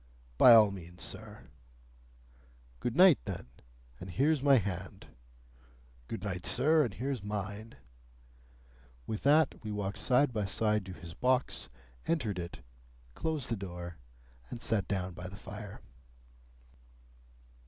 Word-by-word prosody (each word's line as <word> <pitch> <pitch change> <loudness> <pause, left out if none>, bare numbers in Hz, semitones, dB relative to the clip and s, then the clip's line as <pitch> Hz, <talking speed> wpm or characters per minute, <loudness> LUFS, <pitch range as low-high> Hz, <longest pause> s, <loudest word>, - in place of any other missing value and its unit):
"By 120 - +10
all 105 -3 +7
means, 90 -2 -9
sir." - - -6 1.4
"Good 120 - -2
night, 180 -2 +7
then, 95 -4 -5 0.5
and 95 - -8
here's 140 - +2
my 140 -1 +6
hand." 95 -4 -4 1.0
"Good 115 - -5
night, 95 -4 -3
sir, 155 +2 +4
and 115 -8 -3
here's 130 -1 -3
mine." 105 +2 -5 1.3
With 110 +6 -4
that 150 0 +3
we 105 - -4
walked 100 -1 -3
side 130 +1 +3
by 105 -2 -1
side 105 0 0
to 95 - -6
his 85 -2 -10
box, 130 +7 0 0.4
entered 115 - 0
it, 85 0 -7 0.5
closed 155 - -2
the 115 - 0
door, 90 -4 -7 0.5
and 120 - -6
sat 105 -5 0
down 95 -2 -2
by 90 +2 -7
the 100 +2 -9
fire. 105 -1 -9
105 Hz, 130 wpm, -32 LUFS, 95-125 Hz, 1.4 s, By